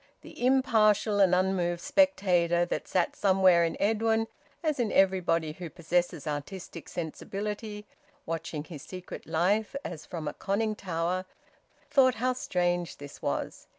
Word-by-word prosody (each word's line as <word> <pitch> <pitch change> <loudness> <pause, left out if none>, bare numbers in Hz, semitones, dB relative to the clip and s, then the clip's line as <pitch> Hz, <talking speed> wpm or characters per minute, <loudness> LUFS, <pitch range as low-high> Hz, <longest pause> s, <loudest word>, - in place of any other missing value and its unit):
The - - -9
impartial 220 -5 +3
and 185 -2 +5
unmoved 180 -2 +1
spectator 180 - +3
that - - -3
sat 180 -2 0
somewhere 185 -3 +4
in 165 - -1
Edwin, 225 +1 +2 0.4
as 305 -4 0
in 230 -3 +1
everybody 175 -4 +2
who 175 +1 -7
possesses 170 -2 -1
artistic 160 +3 -6
sensibility, 210 +5 -5 0.4
watching 165 -2 -4
his 155 -3 -9
secret 180 +4 -9
life 190 +9 +1
as 160 -2 -7
from 160 -4 -5
a 150 - -2
conning 215 +3 -1
tower, 180 -1 -2 0.7
thought 260 -2 +5
how 255 +3 +1
strange 175 -7 -1
this 145 0 -11
was. - - -3
185 Hz, 135 wpm, -29 LUFS, 170-210 Hz, 0.7 s, and